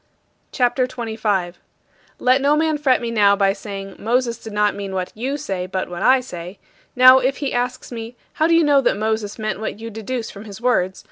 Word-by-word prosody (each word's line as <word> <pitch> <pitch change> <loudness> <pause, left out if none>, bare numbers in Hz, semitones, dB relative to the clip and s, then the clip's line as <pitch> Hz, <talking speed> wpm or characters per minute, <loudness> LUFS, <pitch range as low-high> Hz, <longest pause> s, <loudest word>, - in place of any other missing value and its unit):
CHAPTER 250 0 +1
XXV 255 - -14 0.2
34. 190 -5 0 0.6
Let 255 +2 +3
no 285 +2 +3
man 310 -1 +1
fret 265 -4 +2
me 235 -1 -3
now 205 -3 +4
by 195 -1 +2
saying, 195 -1 -8
"Moses 235 +1 0
did 220 - -9
not 210 0 +1
mean 195 -1 -6
what 185 -1 -3
you 260 +6 -3
say, 190 -9 -4
but 185 0 -3
what 175 0 -6
I 260 +4 +5
say." 180 -5 -8 0.4
Now 255 +1 +8
if 265 +2 0
he 280 -2 -3
asks 250 +1 -3
me, 230 0 -7 0.2
"How 315 - +2
do 335 - +4
you 335 - +5
know 290 -2 +4
that 240 - +1
Moses 215 -1 -2
meant 215 -3 -3
what 220 -1 -5
you 230 0 -7
deduce 225 +2 -5
from 200 +1 -11
his 200 -2 -9
words?" 190 -7 0
225 Hz, 215 wpm, -20 LUFS, 200-255 Hz, 0.6 s, Now